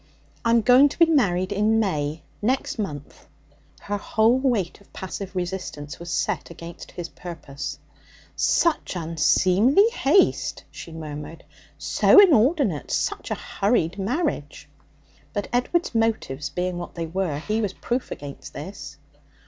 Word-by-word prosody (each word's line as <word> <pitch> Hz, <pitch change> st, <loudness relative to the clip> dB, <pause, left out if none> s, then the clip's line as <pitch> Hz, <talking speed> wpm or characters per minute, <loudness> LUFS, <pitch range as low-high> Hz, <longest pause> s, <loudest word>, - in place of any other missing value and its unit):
'I'm 230 Hz, 0 st, +4 dB
going 255 Hz, +5 st, +6 dB
to -, -, -9 dB
be 335 Hz, -, +7 dB
married 190 Hz, -, +2 dB
in 215 Hz, +2 st, +2 dB
May, 155 Hz, -7 st, -1 dB, 0.2 s
next 250 Hz, +2 st, -1 dB
month.' 145 Hz, -9 st, -6 dB, 0.5 s
Her 205 Hz, 0 st, -3 dB
whole 225 Hz, +4 st, +2 dB
weight 230 Hz, -10 st, 0 dB
of 200 Hz, -, -23 dB
passive 190 Hz, 0 st, -6 dB
resistance 175 Hz, -5 st, -5 dB
was 170 Hz, 0 st, -8 dB
set -, -, -1 dB
against 170 Hz, 0 st, -10 dB
his 175 Hz, -1 st, -6 dB
purpose. 145 Hz, -6 st, -7 dB, 0.6 s
'Such 335 Hz, -, +1 dB
unseemly 185 Hz, -, +3 dB
haste!' 345 Hz, -, +2 dB
she 170 Hz, -, -9 dB
murmured. 155 Hz, 0 st, -8 dB, 0.3 s
'So 145 Hz, -, +5 dB
inordinate 275 Hz, -, +4 dB
such -, -, -2 dB
a -, -, -1 dB
hurried 200 Hz, -3 st, 0 dB
marriage!' 225 Hz, -, -2 dB, 0.7 s
But, 205 Hz, -, -3 dB
Edward's 250 Hz, +8 st, 0 dB
motives 220 Hz, -, -1 dB
being 180 Hz, +3 st, -2 dB
what 175 Hz, -, -8 dB
they 165 Hz, -1 st, -3 dB
were, 170 Hz, -2 st, -2 dB
he 215 Hz, +8 st, -1 dB
was 200 Hz, -3 st, -2 dB
proof 245 Hz, +5 st, -3 dB
against 140 Hz, -1 st, -8 dB
this. -, -, -8 dB
190 Hz, 135 wpm, -24 LUFS, 165-235 Hz, 0.7 s, be